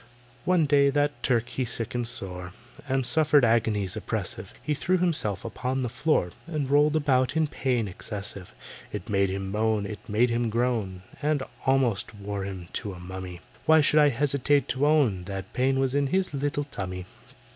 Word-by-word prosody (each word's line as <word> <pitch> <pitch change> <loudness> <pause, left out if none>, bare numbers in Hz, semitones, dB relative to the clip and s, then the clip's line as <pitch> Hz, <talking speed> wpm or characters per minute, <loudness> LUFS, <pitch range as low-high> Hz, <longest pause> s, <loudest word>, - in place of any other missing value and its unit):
One 180 -3 +3
day 140 -1 +4
that 145 +1 0
Turk 120 -2 +1
he 130 +1 -2
sickened 120 0 -1
sore, 90 -5 -6 0.4
And 135 -1 +1
suffered 150 -2 +4
agonies 110 -4 +1
oppressive; - - -3
He 150 - 0
threw 180 +6 +1
himself 150 - -1
upon 130 +3 -2
the 125 - -1
floor 135 - +1 0.2
And 150 -5 -2
rolled 145 +1 +4
about 140 -1 +2
in 160 - +3
pain 125 -6 -1
excessive. 100 0 -7 0.4
It 115 - -6
made 100 -2 +2
him 95 0 -3
moan, 110 0 +1
it 105 0 -6
made 115 +4 +3
him 115 0 0
groan, 110 -6 -1 0.2
And 150 -2 +1 0.2
almost 125 -6 +1
wore 100 -1 -4
him 95 -3 -7
to 100 - -5
a 90 - -10
mummy. 90 0 -7 0.3
Why 160 0 +7
should 150 +1 +4
I 150 -1 +6
hesitate 140 +2 +2
to 135 +3 +1
own 125 -13 +3
That 95 -1 -6
pain 135 +1 +2
was 135 -1 +1
in 140 0 +2
his 185 +5 0
little 145 +1 -1
tummy? 95 -9 -6
125 Hz, 175 wpm, -27 LUFS, 100-145 Hz, 0.4 s, Why